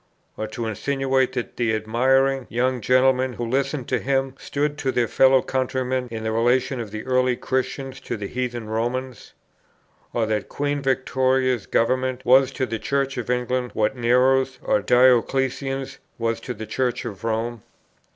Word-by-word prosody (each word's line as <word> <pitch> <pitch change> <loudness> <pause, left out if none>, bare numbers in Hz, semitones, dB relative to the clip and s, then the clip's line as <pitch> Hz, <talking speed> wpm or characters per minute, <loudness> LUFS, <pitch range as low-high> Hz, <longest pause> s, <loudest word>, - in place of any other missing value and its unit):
Or 110 - -4
to 115 +2 -5
insinuate 130 +3 0
that 125 -2 -4
the 115 -2 +1
admiring 130 +4 +2
young 125 +1 0
gentlemen 130 +1 +3
who 120 - -4
listened 135 +2 -1
to - - +1
him 135 0 0
stood 145 +1 -2
to 135 - 0
their 120 -2 +1
fellow 130 +1 +4
countrymen 130 -1 -1
in 110 -1 -5
the 110 - -1
relation 120 +3 +1
of 115 -3 -5
the 110 +1 -7
early 130 -1 +2
Christians 130 +1 -3
to - - -5
the 105 - -5
heathen 120 0 -4
Romans? 120 +2 -3 0.8
Or 115 -2 0
that 110 -1 -2
Queen 145 0 -2
Victoria's 130 -2 +1
Government 130 +2 0
was 130 +1 +5
to 130 - -1
the 115 -3 -4
Church 135 +4 -1
of 120 - -5
England 125 0 -1
what 110 +4 +1
Nero's 130 +2 +2
or 105 - +2
Dioclesian's 130 +3 +2 0.2
was 115 -1 -1
to 125 +1 -6
the 110 - -6
Church 125 +1 -2
of 100 -2 -7
Rome? 115 0 -2
125 Hz, 160 wpm, -23 LUFS, 115-130 Hz, 0.8 s, was